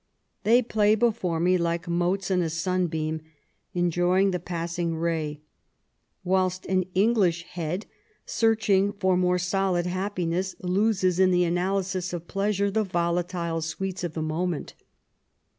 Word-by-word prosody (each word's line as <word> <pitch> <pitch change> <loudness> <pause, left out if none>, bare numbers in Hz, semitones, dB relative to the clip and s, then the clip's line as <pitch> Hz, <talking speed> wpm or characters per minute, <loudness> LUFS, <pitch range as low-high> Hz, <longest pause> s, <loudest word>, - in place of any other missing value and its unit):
They 240 +4 +5
play 215 -2 +3
before 215 -7 0
me 180 +2 +3
like 170 +1 -1
motes 175 +3 0
in 180 -1 +3
a 165 - 0
sunbeam, 160 -2 -1 0.5
enjoying 175 +2 +2
the 180 - -1
passing 170 0 -3
ray; 160 -2 -2 0.8
whilst 185 0 0
an 185 -1 +1
English 190 -5 +3
head, 175 +3 -4 0.4
searching 205 -3 +2
for 190 -2 +1
more 180 0 +2
solid 180 0 0
happiness, 185 -1 -2
loses 185 -1 +1
in 190 -1 +5
the 180 -1 +3
analysis 185 +1 -1
of 175 -1 -5
pleasure 200 0 0
the 220 +2 +1
yolatile 170 -2 -1
sweets 185 +3 -4
of 170 -3 -4
the 160 - -2
moment. 160 +1 -2
180 Hz, 130 wpm, -26 LUFS, 170-195 Hz, 0.8 s, They